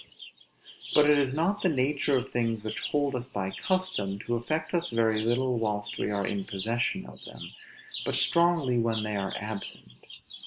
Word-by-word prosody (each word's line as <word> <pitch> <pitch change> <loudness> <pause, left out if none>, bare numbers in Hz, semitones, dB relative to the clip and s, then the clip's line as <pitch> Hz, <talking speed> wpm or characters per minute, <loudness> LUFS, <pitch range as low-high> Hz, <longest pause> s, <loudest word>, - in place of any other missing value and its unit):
But 150 -1 +7
it 150 -1 +6
is 135 -2 +1
the 170 +7 +2 0.2
nature 140 0 +2
of 125 +1 -3
things 115 -3 -1
which 110 - -3
hold 145 -1 +1
us 125 0 -2
by 95 -6 -3
custom, 185 - -1
to 120 - -1
affect 155 +9 -2
us 175 0 +1
very 110 -2 +2
little 120 +2 +1
whilst 105 -2 -2
we - - 0
are 100 -1 0
in 100 0 -2
possession 115 - -1
of - - -12
them, - - -9 0.5
but - - -1
strongly 170 -8 +4
when 115 -2 +1
they 105 -1 -2
are 95 -1 -2
absent. 105 -11 -5
120 Hz, 170 wpm, -28 LUFS, 105-145 Hz, 0.5 s, But